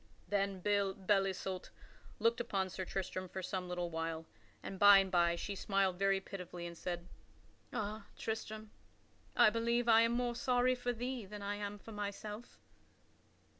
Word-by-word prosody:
Then 195 -2 0
Belle 200 -1 +2
Isoult 195 -1 0 0.5
looked 230 +2 +2
upon 190 -5 -1
Sir 185 0 -4
Tristram 185 0 -3
for 190 +1 -5
some 180 0 -3
little 175 -1 -2
while, 165 0 -3 0.4
and 190 - -6
by 205 -1 +10
and 195 -1 +2
by 170 -2 +4
she 200 - -4
smiled 195 -2 +1
very 195 0 +3
pitifully 180 -3 -7
and 170 0 -6
said: 175 0 -4 0.6
"Ah, 215 0 -3
Tristram, 220 -1 -4 0.6
I - - +7
believe 235 +2 +1
I 225 -1 +7
am 230 0 +3
more 240 0 0
sorry 250 +1 +2
for 245 -1 -1
thee 245 -2 -4
than 205 0 -7
I 200 +1 -1
am 205 0 -4
for 225 - -12
myself." 210 +2 -6
200 Hz, 160 wpm, -35 LUFS, 185-220 Hz, 0.6 s, by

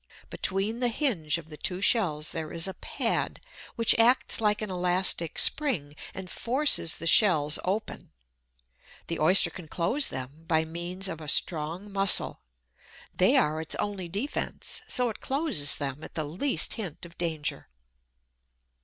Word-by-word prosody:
Between 200 +5 -1
the 250 - +1
hinge 215 - 0
of 160 -1 -12
the 150 - -10
two 180 +3 -3
shells 170 -8 +3
there 160 -1 -6
is 165 +2 0
a 190 - -6
pad, - - -3 0.4
which 230 -1 +2
acts 240 0 +2
like 210 0 0
an 210 - -6
elastic 180 -2 +2
spring, 185 - +1 0.2
and 190 -1 -7
forces 250 - +3
the 165 - -8
shells 160 -5 +5
open. 205 +4 -5 1.0
The 165 - -4
Oyster 180 +5 +5
can 180 -4 -11
close 210 - 0
them 135 +5 -8
by 160 -1 +1
means 175 +4 -6
of 165 -3 -7
a 155 - -10
strong 165 +6 -1
muscle. 195 -1 +2 0.7
They - - +3
are 155 +1 0
its 160 - -1
only 195 -4 -5
defence, 210 - -4
so 250 -1 +1
it 220 - -8
closes 270 - +1
them 140 0 -5
at - - -11
the 155 -2 -3
least 195 - -1
hint 185 -8 -7
of 170 0 -15
danger. 160 -4 -3
180 Hz, 155 wpm, -26 LUFS, 160-210 Hz, 1.0 s, shells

